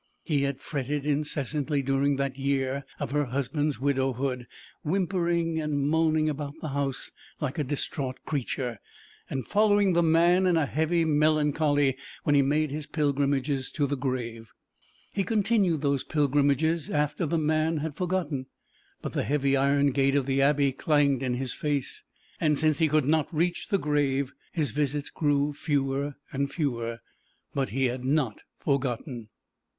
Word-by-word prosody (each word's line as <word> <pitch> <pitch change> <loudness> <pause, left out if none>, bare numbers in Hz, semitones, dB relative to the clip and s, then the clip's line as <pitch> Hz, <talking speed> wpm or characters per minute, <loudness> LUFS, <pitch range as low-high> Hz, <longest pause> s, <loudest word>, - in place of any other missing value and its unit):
He 150 -5 +1
had 140 -1 -2
fretted 145 0 -3
incessantly 145 -1 -1
during 135 +1 +2
that 140 -1 -2
year 135 0 -1
of - - -3
her 145 0 +1
husband's 140 +3 -1
widowhood, 130 -2 0 0.4
whimpering 170 -2 0
and 150 -2 -1
moaning 155 0 +2
about 145 -1 -3
the 155 - -4
house 140 -1 -2 0.3
like 150 +1 -3
a - - +2
distraught 135 -1 -3
creature, 125 -5 -3 0.5
and 130 - -3
following 205 -2 +3
the 170 - +4
man 170 +3 +4
in 175 -2 +3
a 160 - +2
heavy 160 +4 +1
melancholy 150 -2 +2 0.3
when 145 - +2
he 140 - +6
made 150 +2 +1
his 150 0 -5
pilgrimages 140 -2 0
to 145 - +1
the 140 +1 -1
grave. 120 -4 -4 0.6
He 195 - +1
continued 200 -5 +2
those 140 -1 +1
pilgrimages 145 +2 +1
after 150 +3 0
the 165 - 0
man 155 +1 +1
had 150 0 -3
forgotten, 170 -7 -2 0.6
but - - -4
the - - 0
heavy 140 -1 +1
iron 140 +1 +3
gate 135 +1 +2
of 140 -2 +2
the 135 0 +1
Abbey 140 0 +3
clanged 140 -1 +2
in 125 -2 0
his 130 0 -3
face, 145 -3 -2 0.4
and 150 -2 +2
since 155 0 +2
he 160 - +4
could 155 -2 +2
not 155 0 +1
reach 170 +2 0
the 200 - +2
grave 140 -4 0 0.2
his 155 -4 -1
visits 145 0 -1
grew 145 -1 +1
fewer 140 -1 -1 0.2
and 140 +1 -1
fewer. 120 -7 -2 0.5
But 135 -5 -1
he 135 +5 0
had 125 0 -2
not 135 -5 0 0.2
forgotten. 125 -4 -2
145 Hz, 155 wpm, -27 LUFS, 135-155 Hz, 0.6 s, he